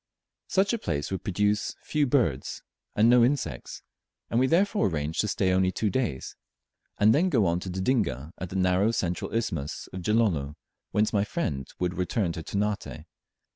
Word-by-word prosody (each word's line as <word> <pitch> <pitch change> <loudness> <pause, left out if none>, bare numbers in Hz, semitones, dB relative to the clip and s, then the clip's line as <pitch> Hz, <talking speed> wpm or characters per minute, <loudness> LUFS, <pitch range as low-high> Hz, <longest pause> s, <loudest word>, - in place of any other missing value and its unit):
Such 195 +2 +2
a 230 - -1
place 75 - -3
would 95 -1 -3
produce 105 +2 0
few 150 -2 +1
birds 115 - 0 0.3
and 110 +2 +5
no 120 0 +6
insects, 120 - -2 0.5
and 115 - +2
we 130 - +3
therefore 170 - +2
arranged 80 -1 -1
to 105 - -1
stay 95 -2 +1
only 95 0 +3
two 105 +2 -1
days, 80 - -2 0.6
and 105 +2 +5
then 175 +6 +3
go 120 - +3
on 85 0 +1
to 95 - -6
Dodinga, 90 - -1
at 90 - -5
the 95 - -7
narrow 95 +2 +3
central 90 -6 -2
isthmus 85 -11 -2
of 95 - -5
Gilolo, 85 -9 +1 0.3
whence 105 +2 +1
my 100 -2 +3
friends 75 - -3
would 90 0 -2
return 90 0 0
to 85 0 -5
Ternate. 100 -4 -3
100 Hz, 175 wpm, -27 LUFS, 85-115 Hz, 0.6 s, no